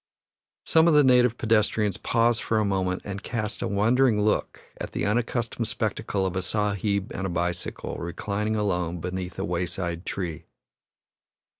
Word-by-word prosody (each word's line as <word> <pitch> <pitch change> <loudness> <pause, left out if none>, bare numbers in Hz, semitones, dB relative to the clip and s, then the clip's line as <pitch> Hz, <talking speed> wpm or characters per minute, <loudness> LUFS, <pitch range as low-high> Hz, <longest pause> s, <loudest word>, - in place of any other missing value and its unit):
Some 160 +1 +5
of 165 - +5
the 150 - +7
native 125 -2 +4
pedestrians 105 -2 +2
pause 115 0 +2
for 110 - 0
a 110 - +2
moment 95 -2 -1
and 100 -1 -5
cast 110 -2 -3
a - - 0
wondering 115 +3 +3
look 105 0 0 0.2
at - - -6
the - - -1
unaccustomed 115 +1 0
spectacle 110 -4 -1
of 95 0 -2
a 95 - 0
Sahib 100 +1 -1
and 95 - -2
a - - -4
bicycle 85 +1 -3
reclining 100 +5 -2
alone 90 -5 -1
beneath 90 +1 -5
a 95 - -2
wayside 85 -1 -3
tree. 85 -5 -4
100 Hz, 155 wpm, -26 LUFS, 90-115 Hz, 0.2 s, the